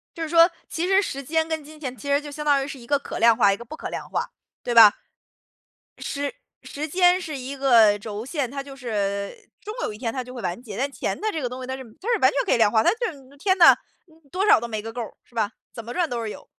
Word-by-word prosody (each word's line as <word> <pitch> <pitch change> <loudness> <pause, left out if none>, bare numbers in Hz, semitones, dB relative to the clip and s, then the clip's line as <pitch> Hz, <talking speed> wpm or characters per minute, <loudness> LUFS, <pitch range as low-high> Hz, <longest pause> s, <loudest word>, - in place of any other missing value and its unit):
就 330 - -4
是 315 - -4
说， 335 +1 +6 0.2
其 340 +2 -2
实 390 +1 +4
时 275 -8 -4
间 320 +4 0
跟 320 -1 -2
金 305 +2 -13
钱 265 -4 -6
其 285 - -10
实 280 +1 +3
就 290 -1 -9
相 300 +1 -6
当 285 -2 +3
于 270 - -5
是 275 - -8
一 235 - -14
个 285 - +3
可 280 - -7
量 230 0 +6
化， 200 -2 +4
一 - - -4
个 235 - -10
不 275 - -8
可 - - -6
量 - - -6
化， - - -3 0.3
对 240 - -2
吧？ 220 -3 +9 1.0
时 285 0 -4 0.3
时 300 +2 -5
间 360 +3 +4
是 315 -6 -6
一 265 +2 -6
个 230 -6 +5
轴 215 +2 -6
线， 280 -4 -2
它 275 +1 -5
就 275 -1 -11
是 255 -3 -8
呃， 200 -1 -1 0.3
终 425 +1 -6
有 - - -2
一 - - -9
天 225 0 -3
它 260 - -3
就 250 0 -11
会 245 - -7
完 180 +4 -3
结。 210 -5 -8
但 275 +5 -1
钱 - - -3
的 435 0 -2
这 320 - -3
个 250 - -2
东 255 +1 -7
西 - - -6
它 260 - -4
是 265 - -7 0.2
它 415 - -7
是 450 - +2
完 260 - +6
全 280 - 0
可 - - 0
以 - - +3
量 220 -2 +4
化， 220 0 +3
它 - - +4
就 460 -2 -2
是 275 -2 -16
天 375 +5 +2
呐， 340 - +8 0.6
多 385 +3 0
少 415 - +6
都 235 - -5
没 215 -2 -4
个 225 +1 -7
够 245 - -5
儿， 230 - -6
是 - - -27
吧？ 215 -3 0 0.2
怎 230 - -8
么 235 +2 -8
赚 350 -2 +1
都 235 -1 -2
是 225 - -4
有， 210 - -9
270 Hz, 320 characters per minute, -24 LUFS, 230-310 Hz, 1.0 s, 吧